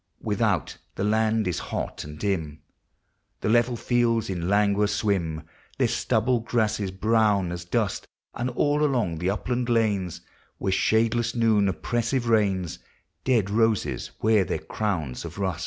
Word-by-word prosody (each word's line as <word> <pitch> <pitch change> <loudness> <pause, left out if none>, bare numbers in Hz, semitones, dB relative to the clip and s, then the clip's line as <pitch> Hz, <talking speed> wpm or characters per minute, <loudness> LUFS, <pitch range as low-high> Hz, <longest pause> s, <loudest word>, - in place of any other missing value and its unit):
Without, - - 0 0.2
the - - -2
land 110 0 +2
is 90 - -1
hot - - -4
and 75 0 -9
dim; 80 -5 -2 0.8
The - - 0
level 120 +2 +3
fields 115 -3 +1
in 90 -1 -2
languor 105 0 +3
swim, 95 -7 -1 0.3
Their - - +3
stubble 120 +2 +1
grasses 110 -3 0
brown 100 -2 +2
as 85 0 -5
dust; 105 +1 -1 0.3
And 125 +2 -2
all 145 +4 +1
along 120 - 0
the 90 +2 0
upland 120 +4 -2
lanes, 105 -7 0 0.4
Where 95 - -1
shadeless 115 +3 +2
noon 110 -4 +3
oppressive 120 - -1
reigns, 100 -6 +1 0.4
Dead 115 -7 +2
roses 110 -1 +1
wear 110 -2 +4
their - - -2
crowns 80 -12 -3
of 85 +1 -8
rust. 95 -3 -2
105 Hz, 140 wpm, -25 LUFS, 95-115 Hz, 0.8 s, wear